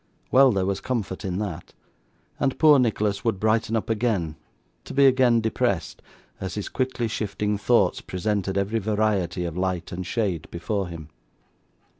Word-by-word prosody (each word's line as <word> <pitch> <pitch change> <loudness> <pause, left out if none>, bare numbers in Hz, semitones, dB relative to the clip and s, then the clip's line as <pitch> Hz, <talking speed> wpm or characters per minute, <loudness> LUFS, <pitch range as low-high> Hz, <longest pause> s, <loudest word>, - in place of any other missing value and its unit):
Well, 135 0 +6
there 95 -3 0
was 95 0 -1
comfort 110 -7 -3
in 95 -2 -2
that; 90 -5 -5 0.6
and 135 -2 0
poor 150 -3 +6
Nicholas 105 -4 0
would 115 -5 0
brighten 110 +1 +1
up 110 - -1
again, 105 -8 0 0.5
to - - -8
be 140 0 +6
again 125 -3 +4
depressed, 110 -5 -1 0.4
as 95 -2 -5
his 105 - -4
quickly 130 -3 -1
shifting 105 -1 -2
thoughts 100 -1 +2
presented 95 0 -2
every 100 +3 0
variety 105 -4 0
of 85 -2 -4
light 90 -1 -2
and 90 +1 -4
shade 90 -4 -2
before 95 +3 -2
him. 80 -3 -9
105 Hz, 155 wpm, -24 LUFS, 95-115 Hz, 0.6 s, Well